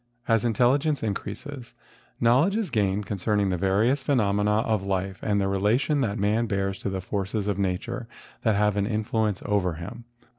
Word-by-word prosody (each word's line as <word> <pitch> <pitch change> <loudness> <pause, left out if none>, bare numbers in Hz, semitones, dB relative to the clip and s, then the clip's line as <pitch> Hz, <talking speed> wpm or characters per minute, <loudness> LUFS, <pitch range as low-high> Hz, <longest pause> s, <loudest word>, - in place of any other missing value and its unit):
As 115 -2 +3
intelligence 130 +6 +2
increases, 120 +5 -5 0.4
knowledge 130 - +4
is 220 -4 -1
gained 100 -2 +1
concerning 100 0 0
the - - +1
various 100 +9 +2
phenomena 105 -5 +2
of 110 -3 0
life 95 0 -2
and 105 -2 +1
the 100 - +1
relation 110 +10 +1
that 110 -4 -1
man 105 +4 +1
bears 95 -2 -1
to - - -3
the 95 -1 -3
forces 100 +2 -2
of 100 -2 -1
nat¬ 95 -2 -1
ure 120 -2 -5 0.3
that 110 -3 +2
have 105 0 +2
an 100 0 +1
influence 110 -2 -1
over 95 -5 +1
him. 105 +9 -8
105 Hz, 175 wpm, -26 LUFS, 100-115 Hz, 0.4 s, knowledge